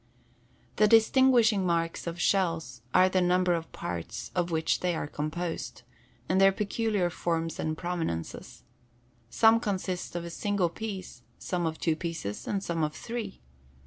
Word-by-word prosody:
The 215 - +5
distinguishing 225 -2 +5
marks 170 -1 -1
of 170 +1 -4
shells 165 -10 0
are 185 - +6
the 185 0 +1
number 180 0 +3
of 165 -1 -3
parts 85 -2 -5
of 175 -1 0
which 160 -1 +1
they 180 -1 0
are - - -2
composed, 155 +3 -4 0.4
and 190 +1 +2
their 195 0 +7
peculiar 205 -2 0
forms 165 -1 -2
and 155 0 -2
prominences. 165 - -4 0.7
Some 225 - +5
consist 185 -5 -3
of 170 -1 -3
a 170 - -6
single 200 -1 0
piece, 190 - -6 0.2
some 175 -2 -2
of 160 0 -3
two 165 -2 +1
pieces, 160 - -5
and 200 -1 -1
some 165 -3 -1
of 150 0 -1
three. 230 -4 -6
175 Hz, 150 wpm, -28 LUFS, 165-200 Hz, 0.7 s, their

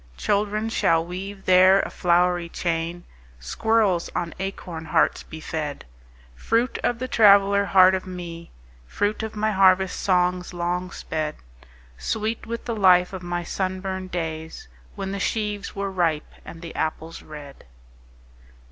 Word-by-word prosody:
Children 210 - 0
shall 165 -6 +2
weave 195 +3 -7
there 185 +1 +6
a - - -5
flowery 175 -1 +2
chain, 170 0 -3 0.4
Squirrels 195 - +1
on 170 -2 -2
acorn 180 -4 -5
hearts 160 +1 +2
be 160 - -10
fed:— 155 -3 -5 0.5
Fruit 230 - 0
of 245 - +1
the 255 +2 -4
traveller 200 -3 +5
heart 190 -1 +6
of 190 0 -2
me, 170 -2 -8 0.4
Fruit 205 - -1
of 220 0 -5
my 215 +1 0
harvest 190 -1 +3
songs 180 -1 +1
long 175 +1 -2
sped: 155 -4 -4 0.6
Sweet 220 - -3
with 230 +1 -5
the 235 - -2
life 185 -3 +4
of 190 - -5
my 175 0 -3
sunburned 190 +1 -3
days 160 - -5 0.3
When 195 0 -4
the 200 - -4
sheaves 210 0 -2
were 200 0 -3
ripe, 165 -5 -1
and 165 0 -11
the 165 - -7
apples 160 +1 -3
red. 150 -2 -11
185 Hz, 140 wpm, -24 LUFS, 170-200 Hz, 0.6 s, there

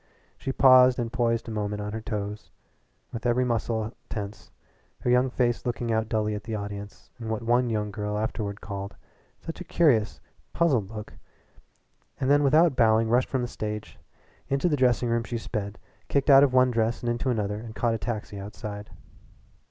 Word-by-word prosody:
She 135 - -4
paused 130 -1 +6
and 120 -1 -3
poised 115 -2 0
a - - -5
moment 105 -1 -2
on 105 0 -4
her 110 - -4
toes 105 0 -5 0.6
with 115 +1 -3
every 125 +1 +2
muscle 115 -1 -1 0.2
tense, 105 -2 -6 0.5
her 125 - +1
young 125 +1 +4
face 120 -1 0
looking 120 -1 -2
out 110 0 0
dully 110 -1 0
at 105 -1 -6
the 110 - -3
audience 100 0 -7
in 115 -2 -5
what 110 0 -2
one 120 +1 +2
young 105 -2 -1
girl 105 0 -3
afterward 105 -1 -3
called 100 -1 -6 0.5
"such 165 - -7
a - - -4
curious, 145 -11 +2 0.3
puzzled 135 - +2
look," 105 -1 -8 1.1
and 135 0 +1
then 145 0 +5
without 150 +2 +4
bowing 110 -1 +4
rushed 125 +2 +2
from 130 -2 -1
the - - -2
stage. 105 -2 -6 0.5
Into 140 +5 +1
the 155 - +2
dressing 125 -2 +2
room 115 0 +1
she 120 0 -4
sped, 105 -3 -4 0.3
kicked 140 +1 +2
out 135 0 +9
of 140 - +3
one 130 0 +4
dress 115 0 0
and - - -2
into 120 +3 -1
another, 105 -3 -1
and 110 0 -9
caught 120 -2 +1
a 115 - -2
taxi 105 -1 -4
outside. 105 +1 -7
115 Hz, 185 wpm, -26 LUFS, 105-125 Hz, 1.1 s, out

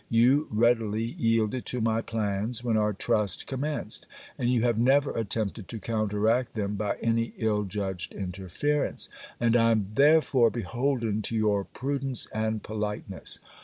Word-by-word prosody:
You 125 +6 +4
readily 110 -1 +2
yielded 115 0 0
to 125 - -2
my 115 0 +1
plans, 110 +1 -2
when 115 -2 +1
our 105 -1 +2
trust 100 -1 0
commenced; 145 +3 -3 0.3
and 120 - -1
you 120 -2 +2
have 120 -2 +2
never 135 +3 +4
attempted 110 -1 -2
to 115 - -5
counteract 110 +2 0
them 105 -2 -1
by 105 0 -2
any 115 0 +1
ill 105 -2 +1
judged 95 -2 -4
interference; 95 - -2 0.3
and 115 0 +3
I 115 -1 +5
am 110 -4 +1
therefore 140 -3 +5
beholden 115 +1 -1
to 115 - -3
your 105 -3 +1
prudence 135 -1 -2
and 110 0 -1
politeness. 105 -2 -3
115 Hz, 145 wpm, -27 LUFS, 105-120 Hz, 0.3 s, I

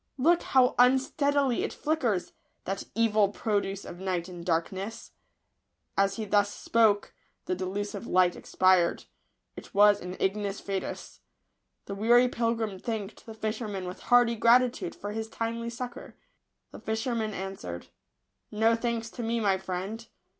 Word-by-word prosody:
Look 335 +6 +4
how 255 -1 +3
unsteadily 265 +1 +3
it - - -2
flickers 240 - -1
— - - -46
that 195 +1 -3
evil 215 -3 +3
produce 200 -2 -2
of 175 - -9
night 185 -2 -2
and 175 -2 -9
darkness 185 +5 -3 0.4
!" - - -51
As 195 0 +2
he 220 - -4
thus 205 0 +2
spoke, 220 -3 +2 0.3
the - - -1
delusive 195 +5 -4
light 180 -1 +3
expired. 185 -2 +2 0.5
It - - -12
was 205 0 +6
an 180 +1 -6
ignis 200 +1 -1
fatuus. 195 -1 -5 0.7
The 200 - -5
weary 240 +5 +4
pilgrim 230 -5 -1
thanked 220 -2 -5
the 225 - -8
fisherman 215 -3 -3
with 180 +1 -7
hearty 245 -1 +4
gratitude 235 -3 +3
for 205 - -6
his 220 +1 -4
timely 230 +1 -3
succour. 245 +2 -7 0.6
The - - -10
fisherman 220 -1 -2
answered, 190 - -6 0.3
" - - -51 0.3
No 225 +2 +3
thanks 230 -1 -2
to 245 - -7
me, 230 0 -1
my 195 -3 +2
friend. 190 +5 -5
215 Hz, 145 wpm, -28 LUFS, 195-235 Hz, 0.7 s, was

